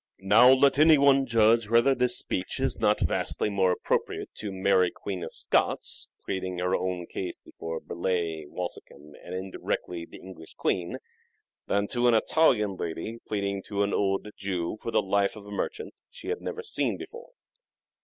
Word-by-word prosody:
Now 110 +6 +7
let 135 +1 +4
any 155 0 +7
one 135 -1 +4
judge 115 -1 +3
whether 115 +4 +4
this 125 -1 +3
speech 90 - -1
is - - +1
not - - +2
vastly 105 - -1
more 95 -2 +2
appropriate - - -2
to 105 -2 -4
Mary 95 -1 +2
Queen 95 0 -6
of 80 - -6
Scots - - 0 0.2
pleading 95 -1 -3
her 90 +1 0
own 90 -1 -2
cause 90 0 -5
before 80 0 -6
Burleigh, 85 -3 -3
Walsingham, 75 -4 -8
and 90 - -7
indirectly 90 -2 -4
the - - -12
English 85 -4 -12
Queen, 85 -2 -1 0.7
than 100 0 +1
to 120 0 +2
an 120 - +5
Italian 110 - +2
lady 85 +8 -5
pleading 100 -2 -2
to 100 -1 0
an 100 - -1
old 95 +1 0
Jew 95 -1 -3
for - - -4
the - - +2
life 100 +1 +1
of 105 -2 -11
a 105 - -11
merchant 420 - -4 0.2
she - - -9
had 440 - -2
never 460 - -5
seen 435 - -1
before. 470 +1 -10
100 Hz, 170 wpm, -27 LUFS, 90-115 Hz, 0.7 s, Now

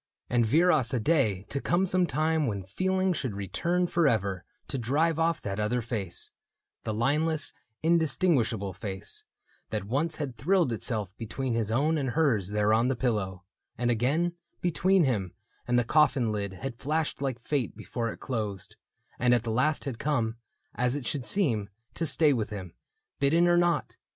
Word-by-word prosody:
And 120 -1 +4
viras 150 -2 +3
a - - +1
day 110 - +2
To 140 - -2
come 180 +2 +2
some 180 -1 +2
time 155 +1 +1
when 100 -4 -2
feeling 185 - 0
should 130 - -3
return 170 - 0
Forever 110 - +1 0.2
to 135 - -3
drive 155 +7 +1
ofF 165 0 +1
that 100 0 -4
other 105 +4 +1
face 110 -7 -4 0.3
— - - -61
The 110 - -1
lineless, 150 +7 0 0.3
indistinguishable 150 - +2
face 95 0 -6 0.2
— - - -37
That 105 -2 -2
once 145 +10 -1
had 140 -5 -4
thrilled 175 -2 +2
itself 110 -4 -3
between 120 +3 -3
his 115 -2 0
own 150 +7 +2
And 135 -3 -1
hers 120 - +2
there 105 +1 +2
on 115 +2 +3
the 130 - +1
pillow, 105 -7 -1 0.2
— - - -47
and 120 0 +1
again 145 +10 +1 0.3
Between 180 +2 +3
him 105 - 0 0.3
and 120 0 +2
the 120 - +4
coffin 135 -3 +3
lid 100 -2 -3
had 120 +5 -6
flashed 155 +1 -1
Like 135 -4 -1
fate 125 -2 -2
before 115 +1 -3
it - - -10
closed, 105 -7 -4 0.2
— - - -35
and 120 0 +4
at 120 - 0
the 115 - -2
last 150 +8 +1
Had 130 -5 -4
come, 115 -6 0 0.4
as 125 +2 0
it 145 -4 -4
should 135 0 -2
seem, 115 - +1 0.2
to 165 - -2
stay 150 -2 +4
with 110 -5 -1
him, 95 -5 -7 0.5
Bidden 165 +5 +4
or 175 - +5
not 175 0 +1
125 Hz, 180 wpm, -28 LUFS, 110-155 Hz, 0.5 s, or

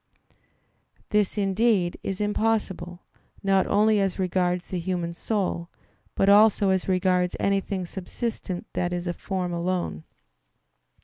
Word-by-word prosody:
_ - - -49
This, 210 0 +1
indeed, 195 -2 +2
is 195 -1 -4
impossible, 205 -4 -1 0.4
not 195 -1 +3
only 210 +1 +3
as 195 -2 0
regards 180 -1 0
the 185 - -2
human 170 -1 -2
soul, 180 -3 -2 0.5
but 195 - +2
also 205 0 +6
as 190 -1 0
regards 180 -1 +2
anything 195 -1 0
subsistent 190 0 -5
that 175 0 -1
is 175 0 -3
a 175 - -1
form 180 -1 -3
alone. 170 - -2
190 Hz, 125 wpm, -25 LUFS, 180-200 Hz, 0.5 s, also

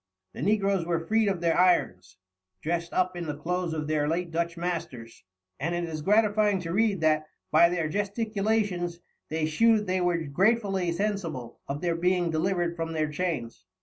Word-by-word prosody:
The - - -7
negroes 195 0 +2
were 165 -1 -2
freed 220 +3 +2
of 190 -3 -1
their 170 -1 +2
irons, 95 - +2 0.5
dressed 170 +1 -2
up 185 0 0
in 175 -2 -5
the 150 -1 -4
clothes 180 +2 -2
of 155 -1 -3
their 150 -1 0
late 170 +2 -1
Dutch 170 +1 -2
masters, 165 - -5 0.4
and 165 +6 -1
it 175 - -1
is 160 -2 -4
gratifying 210 +1 +3
to 165 -1 -4
read 205 -3 +2
that 155 -1 +2 0.2
"by 170 +2 +6
their 170 -3 -1
Gesticulations, 200 -2 -1 0.3
they 160 0 -1
shew'd 215 +7 +3
they 185 -1 0
were 175 -1 +2
gratefully 190 +4 +1
sensible 170 - -3
of 140 +1 -4
their 175 -1 +1
being 175 0 +1
delivered 175 +1 0
from 165 -1 -3
their 155 -1 -1
Chains." 150 - -3
175 Hz, 175 wpm, -27 LUFS, 160-195 Hz, 0.5 s, by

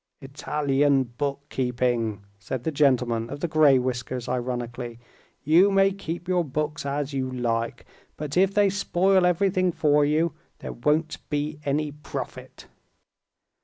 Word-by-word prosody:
"Italian 140 0 +1
bookkeeping," 125 -4 -2 0.2
said 120 +3 -5
the 160 - -1
gentleman 125 -6 +2
of 145 - -6
the 175 - -1
gray 155 -4 +5
whiskers 125 -1 -3
ironically. 120 -1 -4 0.5
"You 170 +7 +5
may 195 0 +4
keep 175 -2 -6
your 180 -1 +2
books 150 0 -3
as 140 0 -2
you 130 -1 -1
like, 115 -2 -2 0.3
but 150 -2 -5
if 190 +2 +4
they 200 -1 +3
spoil 190 -1 +2
everything 185 0 +2
for 150 -2 +3
you, 155 +2 +1 0.2
there - - -7
won't 150 +6 0
be 150 +1 -2
any 145 +1 0
profit." 150 +1 -8
145 Hz, 130 wpm, -25 LUFS, 125-160 Hz, 0.5 s, gray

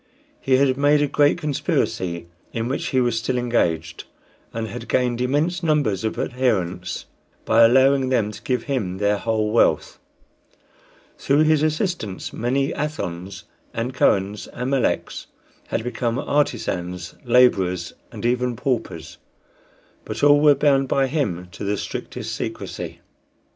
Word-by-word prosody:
He 130 - +2
had 130 -1 +2
made 145 +1 +4
a - - +1
great 145 +1 +3
conspiracy, 95 - -1 0.3
in 115 0 -2
which 135 - -2
he 130 - +1
was 120 -2 +1
still 125 +2 -1
engaged, 85 -9 -1 0.5
and 115 0 -4
had 115 +1 -8
gained 125 -1 +1
immense 150 +8 0
numbers 145 - +1
of 110 - -2
adherents 95 -8 -1 0.4
by 115 +1 +4
allowing 130 +2 +5
them 115 -5 +1
to 105 - -11
give 125 -3 -1
him 105 -10 -2
their 105 0 +1
whole 110 -1 0
wealth. 115 - +2 1.2
Through 145 +3 +3
his 155 -1 +3
assistance 155 - -2
many 135 +4 0
Athons 95 - -4 0.3
and 120 +3 -2
Kohens 100 -4 +1
and 125 +2 -4
Meleks 135 -3 -1 0.4
had 115 - -2
become 120 -1 -2
artisans 95 - -1
laborers, 95 -9 +3 0.2
and - - -7
even 125 0 +1
paupers; 125 -1 -3 0.8
but 110 +3 -6
all 145 0 +6
were 150 -1 +6
bound 135 -1 +3
by 135 +1 +2
him 125 - -2
to 80 - -8
the 100 +1 -1
strictest - - -5
secrecy. - - -6
125 Hz, 140 wpm, -22 LUFS, 105-140 Hz, 1.2 s, all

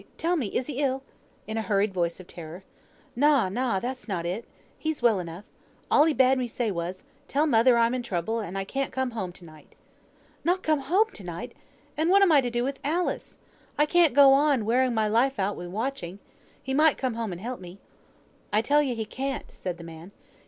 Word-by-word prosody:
tell 345 +2 +1
me, 275 -10 -1
is 245 - -2
he 285 -1 -5
ill?" 270 -2 0 0.4
in 220 +1 -4
a - - 0
hurried 205 -2 +1
voice 170 -1 -1
of 185 - -10
terror. 170 +2 -10 0.5
"Na, 280 -6 +4
na, 235 -1 0
that's 255 +4 -5
not 180 -5 -3
it. 185 +7 -3 0.3
He's 315 -5 -3
well 225 -5 +4
enough. 175 +3 -7 0.5
All 295 - +6
he 320 - +3
bade 260 0 +4
me 250 - -1
say 230 -1 -2
was, 175 +1 -4 0.2
'Tell 290 +3 +1
mother 240 -3 +4
I'm 230 +1 +3
in 255 - -1
trouble, 225 0 -2
and 195 -3 -5
can't 275 +3 -2
come 260 -1 -2
home 190 -6 -4
to 175 - -15
night.'" 155 -2 -16 0.7
"Not 360 +2 +1
come 310 -2 +2
home 400 +10 +2
to - - -10
night! - - -6 0.4
And 315 +2 +1
what 395 +2 +6
am 375 - +5
I 290 -3 +6
to 245 - -2
do 240 0 -1
with 275 +2 -3
Alice? 335 +5 -2 0.4
I 295 - +4
can't 330 -3 +3
go 280 -1 +8
on, 275 -5 +3
wearing 250 +2 +2
my 220 -1 +2
life 245 +5 +2
out 200 +1 0
wi' 175 - -7
watching. 205 -2 -4 0.5
He 265 - -3
might 305 +1 +4
come 255 -4 -2 0.2
and 175 - -6
help 245 +5 -5
me." 180 0 -11 0.7
"I 215 +2 +2
tell 290 +5 +4
you 265 -4 -1
he 220 -1 -3
can't," 270 +5 -4
said 180 -2 -5
the 170 - -10
man. 165 +3 -11
240 Hz, 215 wpm, -26 LUFS, 195-275 Hz, 0.7 s, go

